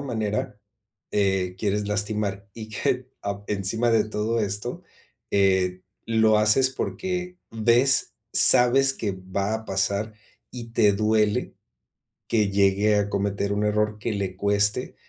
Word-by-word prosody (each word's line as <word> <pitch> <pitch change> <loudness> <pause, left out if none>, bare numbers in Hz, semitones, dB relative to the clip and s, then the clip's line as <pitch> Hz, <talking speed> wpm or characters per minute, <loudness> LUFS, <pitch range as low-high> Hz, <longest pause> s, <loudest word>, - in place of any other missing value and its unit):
manera, 110 -6 -3 0.5
eh, 95 -3 0
quieres 105 0 -1
lastimar 105 -1 -2
y 110 0 -9
que, 125 +4 -2
ah, 100 0 -4
encima 105 +4 -1
de 115 -2 +3
todo 110 +2 -2
esto, 105 +3 -4 0.5
eh, 95 -2 +1 0.2
lo 110 -1 +3
haces 110 +5 +4
porque 180 +6 -4
ves, 120 +4 +3 0.2
sabes 135 +2 +5
que 105 -6 -3
va 95 +3 -3
a 110 0 -5
pasar 100 +2 -1 0.4
y 115 -2 -9
te 105 -3 +3
duele 105 0 0 0.7
que 105 -3 +1
llegue 100 +2 +2
a 105 0 0
cometer 100 0 -2
un 105 +1 -1
error 105 0 0
que 115 - -3
le 95 -2 -4
cueste 100 +1 0
105 Hz, 130 wpm, -24 LUFS, 100-115 Hz, 0.7 s, sabes